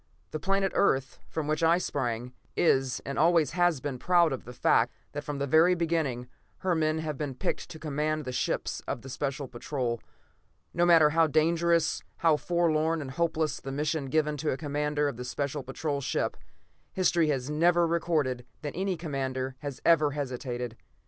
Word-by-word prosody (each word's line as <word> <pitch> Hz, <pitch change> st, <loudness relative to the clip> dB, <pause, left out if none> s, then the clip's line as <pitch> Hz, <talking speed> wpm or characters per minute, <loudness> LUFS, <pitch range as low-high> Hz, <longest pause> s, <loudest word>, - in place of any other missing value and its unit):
The 155 Hz, -, -3 dB
planet 195 Hz, +3 st, +1 dB
Earth, 135 Hz, -8 st, +1 dB
from 160 Hz, -, -3 dB
which 155 Hz, +1 st, -1 dB
I 165 Hz, +1 st, +5 dB
sprang, 125 Hz, -7 st, -2 dB, 0.2 s
is 135 Hz, -7 st, +2 dB
and 140 Hz, 0 st, -3 dB
always 160 Hz, -3 st, +4 dB
has 175 Hz, -4 st, +2 dB
been 135 Hz, -3 st, -4 dB
proud 170 Hz, -2 st, +4 dB
of 130 Hz, -, -6 dB
the 125 Hz, -, -8 dB
fact -, -, +3 dB, 0.2 s
that -, -, -5 dB
from 145 Hz, -1 st, -4 dB
the 140 Hz, -, -1 dB
very 160 Hz, +6 st, +5 dB
beginning, 160 Hz, -8 st, -1 dB, 0.3 s
her 185 Hz, -1 st, +1 dB
men 155 Hz, -1 st, +1 dB
have 155 Hz, -3 st, -4 dB
been 145 Hz, -4 st, -3 dB
picked 185 Hz, -, -3 dB
to 160 Hz, -, -8 dB
command 155 Hz, 0 st, -2 dB
the 130 Hz, -, -3 dB
ships 125 Hz, -, -2 dB
of 120 Hz, -, -3 dB
the 135 Hz, -, -9 dB
Special 140 Hz, +1 st, -3 dB
Patrol. 120 Hz, -2 st, -3 dB, 0.7 s
No 175 Hz, +1 st, +2 dB
matter 160 Hz, -3 st, +6 dB
how 165 Hz, +1 st, +4 dB
dangerous, 165 Hz, +2 st, +2 dB, 0.2 s
how 165 Hz, -2 st, +4 dB
forlorn 165 Hz, 0 st, +1 dB
and 140 Hz, -3 st, -5 dB
hopeless 160 Hz, 0 st, 0 dB
the 135 Hz, -, -6 dB
mission 150 Hz, +1 st, -1 dB
given 150 Hz, +1 st, +1 dB
to 150 Hz, +1 st, -1 dB
a 130 Hz, -, 0 dB
commander 150 Hz, 0 st, -1 dB
of 125 Hz, -4 st, -4 dB
a -, -, -3 dB
Special 140 Hz, +3 st, -3 dB
Patrol 140 Hz, +2 st, -3 dB
ship, -, -, -1 dB, 0.6 s
history 175 Hz, -3 st, +2 dB
has 135 Hz, -1 st, -1 dB
never 170 Hz, +3 st, +4 dB
recorded 160 Hz, -7 st, 0 dB, 0.2 s
that 145 Hz, -, -4 dB
any 190 Hz, -1 st, -1 dB
commander 135 Hz, -4 st, -3 dB
has 145 Hz, -3 st, -6 dB
ever 155 Hz, -4 st, +4 dB
hesitated. 125 Hz, -4 st, -4 dB
150 Hz, 180 wpm, -28 LUFS, 135-165 Hz, 0.7 s, matter